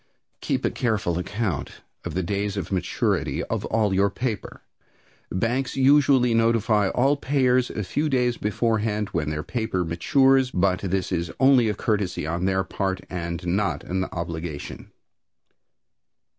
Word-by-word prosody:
Keep - - -1
a - - +1
careful 110 -7 0
record 90 -3 -3 0.3
of - - -5
the 95 - 0
days 100 +2 -2
of 100 - -4
maturity 90 -2 -1
of - - -3
all 110 -3 +1
your 100 +1 +3
paper. 110 0 -4 0.7
Banks 120 +7 -1
usually 135 -3 +4
notify 115 -3 +2
all 135 +7 +2
payers 130 -3 +2
a 105 - -4
few 145 - -1
days 125 -3 +1
beforehand 105 -1 -1
when 75 -3 -2
their 75 0 -3
paper 110 -7 -2
matures, 130 - +3
but 95 -3 +1
this 95 -1 -2
is 85 -2 -1
only 130 -4 +5
courtesy 100 -7 -1
on 85 +3 -2
their 95 0 +1
part 95 0 -2
and 85 -1 -4
not 95 +3 0
an 95 +1 -2
obligation. 85 -4 -6
100 Hz, 140 wpm, -24 LUFS, 90-120 Hz, 0.7 s, only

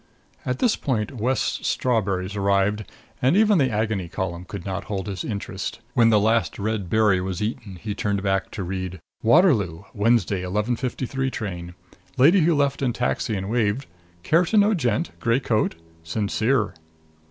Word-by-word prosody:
At 125 0 0
this 240 -3 +2
point 120 -3 -1
West's 125 +4 -1
strawberries 100 -5 0
arrived 100 +1 +1 0.4
and 135 +9 +3
even 210 -3 +5
the 135 -2 +3
Agony 105 -4 -1
Column 90 -1 -4
could 95 -2 -7
not 95 -2 -4
hold 95 -3 -3
his 95 -3 -4
interest. 100 -2 -4
When 120 -4 +5
the 110 -2 +5
last 110 +2 +1
red 105 -3 -2
berry 105 -3 +3
was 95 -1 -3
eaten 105 -2 -4
he 105 +4 -5
turned 100 -1 -1
back 95 -1 0
to 100 - -4
read: 95 0 -4 0.2
WATERLOO: 110 - +3
Wed. 110 +3 +3
11:53 120 +6 -1
train. 90 -7 -5 0.4
Lady 160 +10 +6
who 165 +1 +3
left 140 -1 +1
in 125 -3 +1
taxi 120 -2 -1
and 95 0 -3
waved, 115 +3 0 0.4
care 165 - +4
to 215 - +1
know 210 +1 +5
gent, 145 - 0
gray 115 +2 +2
coat? 110 -9 0 0.3
SINCERE. 110 +6 0
110 Hz, 160 wpm, -24 LUFS, 95-125 Hz, 0.4 s, Lady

